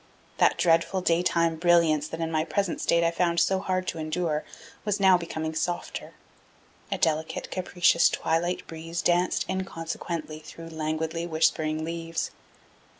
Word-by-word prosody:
That - - +4
dreadful 170 +3 +2
daytime 170 -1 +2
brilliance 165 -3 +3
that 165 +1 -6
in 165 0 -2
my 155 -1 +1
present 195 +2 -1
state 170 0 +3
I 165 - +3
found 170 0 +1
so 190 -1 +2
hard 185 -1 -1
to 165 - -5
endure 155 -1 -1 0.4
was 205 -1 0
now 190 -1 +6
becoming 160 -2 -3
softer. 175 +2 -3 0.8
A - - 0
delicate, 160 0 -1
capricious 180 -2 +3
twilight 170 +2 -1
breeze 165 +1 -5
danced 175 +1 +2
inconsequently 165 -4 -4
through 165 +1 -10
languidly 160 +1 -2
whispering 160 -1 +1
leaves. 165 0 -3
165 Hz, 140 wpm, -27 LUFS, 160-175 Hz, 0.8 s, now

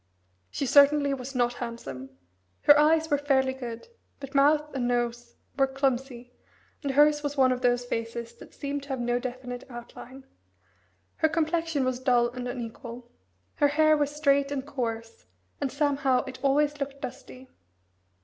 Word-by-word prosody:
She 280 - -3
certainty 285 +1 +5
was 265 0 -6
not 245 -1 +1
handsome. 135 - -7 0.5
Her 290 - +8
eyes 320 +1 +3
were 290 - +3
fairly 265 -2 +2
good, 240 -3 -7 0.3
but 275 -1 -9
mouth 295 +2 +4
and 250 -3 -1
nose 240 0 -2 0.2
were 270 - +4
clumsy, 265 -2 -2 0.5
and 280 -3 -2
hers 295 +1 +5
was 290 0 -4
one 260 -1 +5
of 250 0 -2
those 245 -1 +2
faces 230 0 -4
that - - -14
seem 285 0 -4
to 280 - -14
have 265 -2 -2
no 240 0 0
definite 250 0 -6
outline. 245 +2 -11 0.9
Her 315 - +2
complexion 320 -2 0
was 255 -1 -1
dull 245 -2 +3
and 250 0 -6
unequal. 240 0 -7 0.5
Her 290 - +4
hair 310 +2 +4
was 290 -1 +1
straight 280 -2 +2
and 275 -2 -3
coarse, 230 - -5 0.3
and 275 - -1
somehow 280 -2 +1
it 260 -1 -8
always 290 +1 +2
looked 275 0 -4
dusty. 260 0 -9
265 Hz, 160 wpm, -27 LUFS, 245-285 Hz, 0.9 s, Her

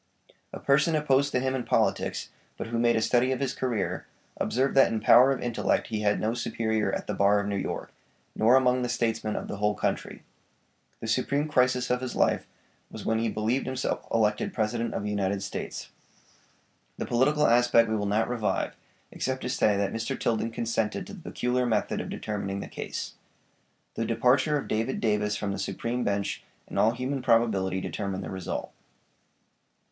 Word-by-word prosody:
A - - -7
person 150 +4 +3
opposed 140 -2 +2
to 125 - +1
him 130 +1 0
in 130 -2 -2
politics, - - 0 0.3
but - - -4
who 115 0 -2
made 120 0 +3
a 110 - +1
study 125 +3 +3
of 130 - -1
his 135 -2 -1
career, 120 -6 -2 0.3
observed 135 +3 0
that 135 - +5
in 110 - 0
power 125 +5 +7
of 135 - -1
intellect 120 -2 0
he 110 - -2
had 105 -1 +2
no 110 +1 0
superior 110 -2 -1
at - - -3
the 105 - -3
bar 100 +1 +4
of 100 - -2
New 100 0 -2
York, 95 - -4 0.4
nor 115 +4 +5
among 125 -1 +3
the 125 - -1
statesmen 115 -3 -1
of - - -4
the - - -5
whole 105 +1 +1
country. - - -3 0.8
The - - -4
supreme 140 +6 +1
crisis 125 -3 +2
of 125 0 +1
his 130 - -4
life - - +1 0.4
was - - -9
when 110 0 +1
he 115 0 0
believed 110 +5 -1
himself 130 0 -2
elected 105 -2 +1
President 115 +1 -1
of - - -2
the 105 - -2
United 100 -1 -1
States. - - -6 1.1
The - - -3
political 150 +5 +2
aspect 120 -1 +5
we 110 - 0
will 105 -1 -1
not 110 +3 +1
revive, 120 -3 -1 0.4
except 130 0 -3
to - - -2
say 105 -5 +2
that 100 -1 0
Mr. 115 0 -3
Tilden 115 0 0
consented 115 -1 -2
to - - -10
the 200 - -10
peculiar 125 0 0
method 110 -3 0
of - - -7
determining 100 -2 -3
the - - -6
case. - - -5 0.8
The 115 - -2
departure 130 +6 +3
of 145 - -5
David 115 +4 -1
Davis 105 -1 +1
from 100 - -2
the 100 - -4
supreme 120 +5 -2
bench 100 0 -1 0.2
in - - -3
all 110 +2 +4
human 130 +3 -3
probability 105 -6 +2
determined 100 0 -4
the - - -6
result. 95 -2 -4
115 Hz, 190 wpm, -27 LUFS, 105-125 Hz, 1.1 s, power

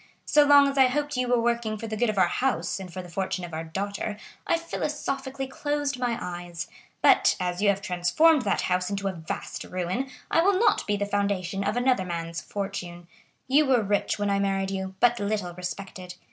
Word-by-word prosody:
So 295 - +5
long 285 -1 +7
as 275 0 -1
I 265 - +7
hoped 290 +2 -1
you 250 0 0
were 245 -1 +3
working 235 -2 0
for 225 - -6
the 220 -1 -4
good 240 +2 +1
of 215 - -2
our 185 - +6
house 255 +3 -1
and 185 -2 -8
for 185 +1 -6
the - - -10
fortune 185 0 -3
of 170 - -11
our 160 +1 -3
daughter, 200 +5 -4 0.3
I 335 - +3
philosophically 275 -5 -3
closed 290 0 -2
my 240 -2 0
eyes; 175 -1 -6 0.4
but - - +5
as 180 0 -2
you 205 - +4
have 200 0 0
transformed 185 - +3
that 200 -4 0
house 180 +1 0
into 200 -1 -2
a - - 0
vast 165 -2 -5
ruin 185 +9 -3 0.2
I 330 - +4
will 385 +2 +3
not 460 - +2
be 205 -1 +1
the 205 - -1
foundation 200 -2 -1
of 205 +4 -1
another 245 -5 +2
man's 170 -1 -4
fortune. 175 -3 -5 0.4
You 285 +3 +4
were 250 -4 +3
rich 205 0 0
when 205 -1 0
I 200 - +2
married 195 -1 0
you, 190 -1 -4
but 240 0 +4
little 205 -3 -2
respected. 180 0 -7
200 Hz, 210 wpm, -26 LUFS, 180-255 Hz, 0.4 s, long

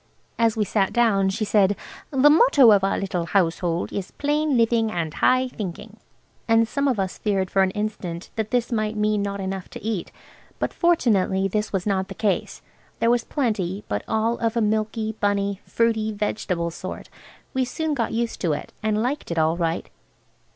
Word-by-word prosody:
As 230 -1 +2
we 210 - +2
sat 195 -1 0
down 210 -5 +3
she 215 +3 -2
said, 205 -1 +3 0.3
"The 280 +1 +5
motto 295 - +6
of 200 -2 +4
our 195 - +1
little 180 -3 -2
household 175 -2 0
is 195 -2 -4
'Plain 295 -1 0
living 230 -1 +2
and 165 -5 -3
high 255 0 +3
thinking.'" 210 -1 -7 0.5
And 225 0 +4
some 280 +4 0
of 250 -6 +1
us 190 -1 -2
feared 195 -3 0
for 195 - +3
an 190 - +3
instant 190 -4 -4
that 220 -1 -2
this 245 0 0
might 215 -1 -1
mean 210 0 +1
not 200 0 -3
enough 190 -1 -4
to - - -10
eat. 215 -5 -3 0.5
But - - -2
fortunately 205 - +2
this 210 +2 -2
was 190 -3 -1
not 190 -2 0
the - - -8
case. 200 -5 -1 0.3
There 230 - +2
was 240 -1 +2
plenty, 210 - -2
but 105 0 -2
all 225 +2 0
of 230 0 0
a - - +4
milky, 215 +1 0
bunny, 200 -1 0
fruity, 225 -2 +1
vegetable 190 -5 -2
sort. 185 +3 -7 0.5
We 260 -1 +1
soon 310 +5 -2
got 240 -5 -1
used 230 0 -2
to 170 -5 +1
it, 145 - -6
and 215 0 0
liked 275 +5 -2
it 170 - -3
all 160 +1 +3
right. 165 -1 -1
210 Hz, 185 wpm, -23 LUFS, 190-230 Hz, 0.5 s, motto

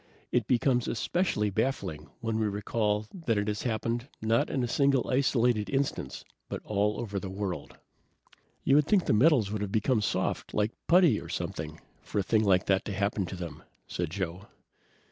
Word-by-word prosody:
It 120 -4 +1
becomes 125 0 +2
especially 110 - 0
baffling 95 - -2
when 115 -2 -1
we 110 - +1
recall 105 +1 0
that 160 - -1
it 105 +1 0
has 105 -1 -1
happened, 115 +1 -2
not 110 +1 +2
in 130 - 0
a - - 0
single 135 0 +2
isolated 125 -4 +2
instance, 140 0 -2 0.2
but - - -3
all 105 0 0
over 100 -4 -3
the 95 - -6
world." 95 -5 -4 0.9
"You 140 - +5
would 150 0 +3
think 200 -4 +3
the - - +2
metals 120 -3 +4
would 105 -1 -2
have 100 -2 -3
become 110 +2 +2
soft, - - -1
like 105 +1 +2 0.2
putty, 170 - +5
or - - -10
something, 80 0 -4 0.2
for - - -6
a 100 - +3
thing 110 +3 +2
like 95 -2 +3
that 95 +1 +2
to 105 - -3
happen 100 -1 0
to 95 - -6
them," 85 -2 -7 0.2
said 85 -2 -3
Joe. 95 +1 -4
110 Hz, 185 wpm, -29 LUFS, 100-125 Hz, 0.9 s, You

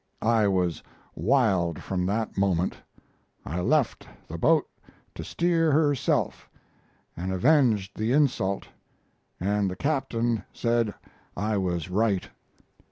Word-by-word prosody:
I 110 -2 +3
was 90 -4 0 0.3
wild 95 - +1
from 90 -1 -2
that 110 +3 -2
moment. 95 -2 +1 0.7
I 85 +5 -3
left 140 +5 +1 0.2
the - - -6
boat - - +3 0.5
to - - -7
steer 165 -2 +1
herself, 145 -3 +1 0.7
and 90 +3 -4
avenged 105 - +2
the 110 +2 0
insult 120 -9 +1 0.7
and 100 +1 0
the 90 - -5
captain 120 -4 -1
said 115 -3 0 0.4
I 105 +2 0
was 90 -3 -2
right." 100 -1 +1
105 Hz, 110 wpm, -26 LUFS, 95-125 Hz, 0.7 s, I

